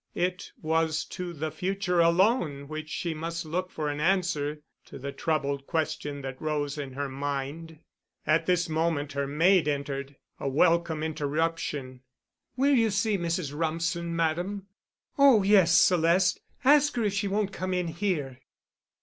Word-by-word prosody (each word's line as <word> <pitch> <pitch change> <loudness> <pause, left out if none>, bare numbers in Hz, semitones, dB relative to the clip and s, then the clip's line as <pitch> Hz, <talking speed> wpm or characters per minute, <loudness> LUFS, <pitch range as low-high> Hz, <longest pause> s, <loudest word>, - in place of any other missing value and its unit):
It 180 +1 -2
was 160 0 +1
to 180 -1 -6
the 155 -1 -4
future 180 +2 -1
alone 170 - +2
which 155 +1 -6
she 170 +1 -3
must 165 +2 -4
look 180 +4 -2
for 155 -3 -4
an 145 0 -3
answer 155 -4 0 0.2
to - - -10
the 140 +1 -5
troubled 140 -3 -2
question 155 -3 -2
that 130 -1 -6
rose 150 -2 -1
in 140 -3 -6
her 140 +1 -3
mind. 145 +4 -4 0.5
At 160 +1 +2
this 180 -1 +2
moment 155 -2 -1
her 140 0 -2
maid 165 +4 +3
entered—a 140 -1 -4
welcome 160 +2 +2
interruption. 150 -3 -2 0.5
"Will 275 +3 +3
you 230 -4 +4
see 205 +1 +1
Mrs. 170 -4 -2
Rumsen, 165 +2 -2
Madame?" 175 +5 -1 0.5
"Oh, 270 -7 +7
yes, 190 -4 +5
Celeste. 180 +1 +3 0.2
Ask 290 +1 +5
her 235 - 0
if 205 -2 0
she 200 0 -1
won't 200 0 -1
come 185 0 -3
in 180 -2 -1
here." 160 -7 -2
165 Hz, 150 wpm, -27 LUFS, 145-180 Hz, 0.5 s, Oh